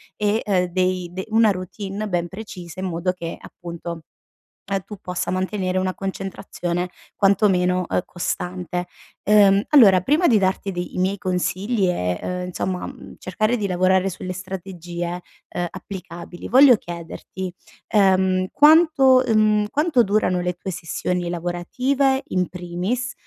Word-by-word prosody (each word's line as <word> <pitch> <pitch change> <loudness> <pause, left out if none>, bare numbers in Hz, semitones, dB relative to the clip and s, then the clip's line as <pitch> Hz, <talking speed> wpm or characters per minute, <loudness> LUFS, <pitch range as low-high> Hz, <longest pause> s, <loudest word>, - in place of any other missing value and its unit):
e, 210 +1 +1
ehm, 185 -3 +2
dei 185 0 -1
de 190 +1 -5
una 225 -1 +5
routine 195 +2 -5
ben 175 -3 -1
precisa 185 -4 -9
in 190 - -3
modo 180 0 -1
che, 170 -2 -6
appunto, 170 -1 -8 0.7
ehm, 195 -1 0
tu 210 - -9
possa 180 0 -3
mantenere 185 0 -1
una 185 0 -1
concentrazione 185 -2 -4 0.3
quantomeno, 185 -3 +3
ehm, - - 0
costante. 180 0 -3 0.4
Ehm, 200 -1 +5
allora, 205 -11 +7
prima 300 - +3
di 225 - +5
darti 190 +1 0
de 175 - -2
i - - -7
miei 190 +2 +1
consigli 185 +3 -1
e 90 - -1
ehm, 180 0 -3
insomma, 180 0 -3
mh, - - -10
cercare 215 +6 0
di 210 - -2
lavorare 185 +1 +2
sulle 185 0 -6
strategie, 175 -2 -6 0.3
ehm, 175 0 -3
applicabili, 175 -2 -8
voglio 260 0 +8
chiederti: 175 0 -7 0.3
ehm, 190 -2 +3
quanto, 295 -4 +6
mhmm 215 -1 +4
quanto 295 -2 +2
durano 195 -3 +1
le 180 0 -1
tue 185 +2 -6
sessioni 175 +1 -3
lavorative 255 +11 0
in 180 -1 0
primis, 180 +9 -3
185 Hz, 140 wpm, -22 LUFS, 180-210 Hz, 0.7 s, voglio